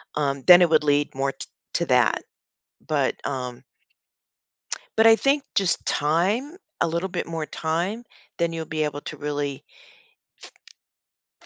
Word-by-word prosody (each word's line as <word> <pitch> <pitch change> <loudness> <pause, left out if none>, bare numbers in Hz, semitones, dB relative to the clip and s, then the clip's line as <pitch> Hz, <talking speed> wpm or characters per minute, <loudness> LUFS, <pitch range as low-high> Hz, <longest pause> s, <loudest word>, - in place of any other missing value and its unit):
um, 140 -2 -1
then 180 0 +10
it 175 - +3
would 155 -1 +4
lead 145 0 +1
more 135 +1 0
t - - -10 0.3
to - - +1
that. - - +3 0.6
But, - - +1
um 125 -3 -5 1.3
But 225 +1 +5
I 225 - +8
think 275 +3 +1
just 195 -3 +1
time, 195 - 0 0.3
a - - +3
little 170 +3 -2
bit - - -4
more 165 -2 -4
time, 175 +9 -2 0.3
then 170 0 0
you'll 165 -1 -5
be 155 0 -1
able 145 -1 -3
to 155 - -7
really 145 -1 -4 1.8
f - - -21
160 Hz, 145 wpm, -24 LUFS, 145-185 Hz, 1.8 s, then